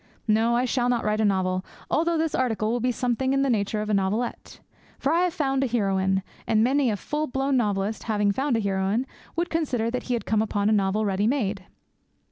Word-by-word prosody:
No, 225 Hz, +2 st, +3 dB
I 245 Hz, +1 st, +2 dB
shall 245 Hz, 0 st, 0 dB
not 240 Hz, -2 st, +1 dB
write 215 Hz, +1 st, +1 dB
a -, -, +3 dB
novel, 185 Hz, -2 st, +1 dB, 0.3 s
although 335 Hz, +1 st, +2 dB
this 320 Hz, -1 st, 0 dB
article 225 Hz, -4 st, 0 dB
will 240 Hz, -, 0 dB
be 250 Hz, +2 st, +1 dB
something 250 Hz, +2 st, 0 dB
in 275 Hz, 0 st, +2 dB
the 275 Hz, -, +2 dB
nature 210 Hz, -1 st, 0 dB
of 215 Hz, -, -6 dB
a -, -, +1 dB
novelette. 200 Hz, +5 st, -2 dB, 0.4 s
For 280 Hz, +3 st, 0 dB
I 335 Hz, -, +3 dB
have 355 Hz, -, -1 dB
found 270 Hz, -4 st, +1 dB
a -, -, +1 dB
heroine, 190 Hz, -4 st, +1 dB, 0.2 s
and 220 Hz, -1 st, +3 dB
many 265 Hz, +1 st, +2 dB
a 210 Hz, -, -1 dB
full 300 Hz, +8 st, -2 dB
blown 270 Hz, +1 st, 0 dB
novelist, 210 Hz, -3 st, 0 dB
having 210 Hz, -2 st, +1 dB
found 265 Hz, +3 st, 0 dB
a -, -, 0 dB
heroine, 200 Hz, +4 st, 0 dB, 0.3 s
would 345 Hz, +1 st, -1 dB
consider 255 Hz, -9 st, 0 dB
that 250 Hz, -, -2 dB
he 245 Hz, -, +2 dB
had 235 Hz, -, -4 dB
come 215 Hz, -1 st, +2 dB
upon 205 Hz, -1 st, 0 dB
a -, -, +3 dB
novel 205 Hz, +1 st, +1 dB
ready 200 Hz, +1 st, +1 dB
made. 210 Hz, -7 st, -1 dB
225 Hz, 225 wpm, -25 LUFS, 205-265 Hz, 0.4 s, No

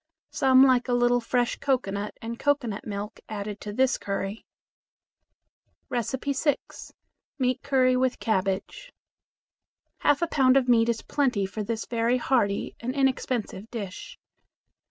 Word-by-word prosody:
Some 265 Hz, -3 st, +5 dB
like 255 Hz, -1 st, +3 dB
a 245 Hz, -, 0 dB
little 245 Hz, 0 st, +3 dB
fresh 245 Hz, +1 st, 0 dB
cocoanut 210 Hz, -7 st, -1 dB
and 235 Hz, +1 st, -5 dB
cocoanut 265 Hz, -9 st, -1 dB
milk 205 Hz, 0 st, -5 dB
added 205 Hz, -1 st, -5 dB
to 210 Hz, -, -5 dB
this 260 Hz, +3 st, +1 dB
curry. 200 Hz, +1 st, -4 dB, 1.5 s
6. 265 Hz, +4 st, -2 dB, 0.4 s
Meat 255 Hz, -2 st, 0 dB
Curry 255 Hz, -2 st, +3 dB
with 255 Hz, 0 st, +1 dB
Cabbage. 200 Hz, -, -2 dB, 1.1 s
Half 290 Hz, +3 st, +2 dB
a -, -, +2 dB
pound 265 Hz, -4 st, +4 dB
of 260 Hz, -2 st, +2 dB
meat 235 Hz, -1 st, +4 dB
is 230 Hz, -1 st, -1 dB
plenty 250 Hz, -9 st, 0 dB
for 195 Hz, +3 st, -5 dB
this 220 Hz, +1 st, -3 dB
very 235 Hz, +1 st, +1 dB
hearty 235 Hz, -6 st, 0 dB
and 250 Hz, +3 st, -4 dB
inexpensive 255 Hz, -6 st, -1 dB
dish. 225 Hz, -, -7 dB
245 Hz, 130 wpm, -26 LUFS, 210-265 Hz, 1.5 s, Some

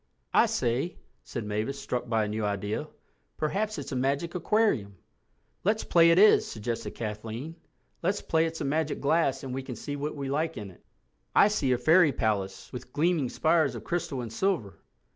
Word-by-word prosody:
"I -, -, +6 dB
say," 125 Hz, +9 st, -1 dB, 0.3 s
said 115 Hz, -4 st, -5 dB
Mavis, 110 Hz, +7 st, -2 dB
struck 125 Hz, -2 st, -3 dB
by 110 Hz, -2 st, +2 dB
a -, -, -3 dB
new 105 Hz, +1 st, -3 dB
idea, 105 Hz, +7 st, -2 dB, 0.5 s
"perhaps 210 Hz, +7 st, -1 dB
it's -, -, -6 dB
a -, -, -2 dB
magic 140 Hz, +6 st, 0 dB
aquarium." 175 Hz, -, +1 dB, 0.7 s
"Let's 215 Hz, +3 st, +1 dB
play 170 Hz, -1 st, +5 dB
it 165 Hz, -, +5 dB
is," 210 Hz, +3 st, +6 dB
suggested 115 Hz, +1 st, -4 dB
Kathleen—"let's 120 Hz, -, -5 dB
play 160 Hz, 0 st, +2 dB
it's 165 Hz, 0 st, -6 dB
a -, -, -1 dB
magic 155 Hz, +2 st, 0 dB
glass 140 Hz, -2 st, +1 dB
and 130 Hz, -2 st, -5 dB
we 135 Hz, -, -2 dB
can 130 Hz, -2 st, -7 dB
see 145 Hz, +6 st, -5 dB
what 145 Hz, +2 st, -3 dB
we 140 Hz, -2 st, -4 dB
like 155 Hz, +4 st, -1 dB
in 100 Hz, -2 st, -6 dB
it. 85 Hz, -, -21 dB, 0.5 s
I 205 Hz, -, +7 dB
see 145 Hz, -11 st, 0 dB
a 125 Hz, -, +3 dB
fairy 160 Hz, +5 st, +5 dB
palace 100 Hz, -6 st, -2 dB
with 125 Hz, 0 st, -8 dB
gleaming 155 Hz, -4 st, +1 dB
spires 160 Hz, 0 st, +2 dB
of -, -, -7 dB
crystal 170 Hz, -7 st, -2 dB
and 115 Hz, -2 st, -7 dB
silver." 165 Hz, -, -1 dB
140 Hz, 180 wpm, -28 LUFS, 115-165 Hz, 0.7 s, I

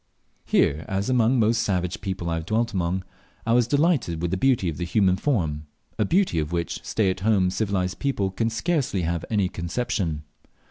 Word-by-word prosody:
Here, 75 Hz, +2 st, +2 dB
as 100 Hz, +6 st, -1 dB
among 125 Hz, 0 st, +3 dB
most 110 Hz, 0 st, +3 dB
savage 90 Hz, -5 st, -1 dB
people 95 Hz, -3 st, -4 dB
I -, -, 0 dB
have 80 Hz, -1 st, -3 dB
dwelt 115 Hz, +1 st, 0 dB
among, 90 Hz, 0 st, -1 dB, 0.4 s
I 115 Hz, -, +2 dB
was 120 Hz, -1 st, +4 dB
delighted 145 Hz, -, +1 dB
with 85 Hz, 0 st, -2 dB
the -, -, +1 dB
beauty 125 Hz, -4 st, +2 dB
of 80 Hz, -3 st, -3 dB
the 85 Hz, -, -3 dB
human 95 Hz, +1 st, +2 dB
form 80 Hz, -, -1 dB, 0.3 s
a -, -, +3 dB
beauty 185 Hz, -, +2 dB
of 75 Hz, +1 st, -2 dB
which 85 Hz, -1 st, -3 dB
stay 100 Hz, -4 st, +1 dB
at 95 Hz, -, -5 dB
home 95 Hz, -3 st, +2 dB
civilized 95 Hz, -2 st, -1 dB
people 105 Hz, -9 st, 0 dB
can 115 Hz, +4 st, 0 dB
scarcely 125 Hz, -, -1 dB
have 85 Hz, 0 st, -1 dB
any 105 Hz, -4 st, +2 dB
conception. 90 Hz, -3 st, -2 dB
95 Hz, 190 wpm, -24 LUFS, 85-115 Hz, 0.4 s, was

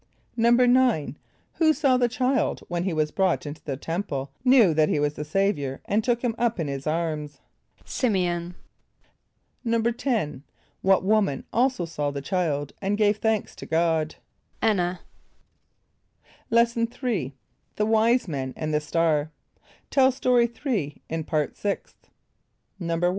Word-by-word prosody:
= -, -, -40 dB
=9.= 240 Hz, -, +3 dB, 0.4 s
Who 315 Hz, -2 st, +5 dB
saw 275 Hz, -3 st, +2 dB
the 245 Hz, -1 st, +2 dB
child 255 Hz, +1 st, 0 dB
when 175 Hz, 0 st, -2 dB
he 190 Hz, -, 0 dB
was 155 Hz, -2 st, 0 dB
brought 190 Hz, -2 st, +1 dB
into 150 Hz, +2 st, -7 dB
the 135 Hz, -3 st, -4 dB
Temple, 140 Hz, -4 st, -4 dB
knew 250 Hz, -9 st, +6 dB
that 155 Hz, 0 st, +3 dB
he -, -, +1 dB
was 145 Hz, 0 st, +1 dB
the 150 Hz, -, -5 dB
Saviour, 150 Hz, -5 st, -1 dB
and 215 Hz, +2 st, +1 dB
took 240 Hz, 0 st, 0 dB
him 240 Hz, -2 st, +1 dB
up 235 Hz, -4 st, +1 dB
in 160 Hz, -, -1 dB
his 140 Hz, +1 st, -4 dB
arms? 155 Hz, -2 st, -2 dB, 0.5 s
=S[)i]m´e 195 Hz, -8 st, +1 dB
on.= 175 Hz, +1 st, -7 dB, 1.1 s
=10.= 230 Hz, -, 0 dB, 0.4 s
What 190 Hz, -1 st, +3 dB
woman 195 Hz, -8 st, +1 dB
also 250 Hz, -6 st, +1 dB
saw 150 Hz, -3 st, -2 dB
the 140 Hz, 0 st, -4 dB
child 150 Hz, -5 st, -1 dB
and 200 Hz, +1 st, 0 dB
gave 210 Hz, -1 st, +3 dB
thanks 220 Hz, -1 st, -1 dB
to -, -, -9 dB
God? 160 Hz, -1 st, +1 dB, 0.5 s
=[)A]n´n[.a].= 185 Hz, -5 st, +1 dB, 1.5 s
Lesson 235 Hz, 0 st, +3 dB, 0.2 s
III. 170 Hz, -, -1 dB, 0.4 s
The 210 Hz, -, +1 dB
Wise 225 Hz, +2 st, +3 dB
Men 135 Hz, -5 st, -4 dB
and 155 Hz, 0 st, -3 dB
the 150 Hz, -, +2 dB
Star. 155 Hz, -1 st, +1 dB, 0.6 s
(Tell 265 Hz, -1 st, +5 dB
Story 250 Hz, -2 st, +3 dB
3 230 Hz, -, -3 dB
in 160 Hz, -1 st, -3 dB
Part 155 Hz, -3 st, -1 dB
Sixth.) 200 Hz, -1 st, -5 dB, 0.7 s
=1. 170 Hz, 0 st, -2 dB
185 Hz, 145 wpm, -25 LUFS, 155-235 Hz, 1.5 s, knew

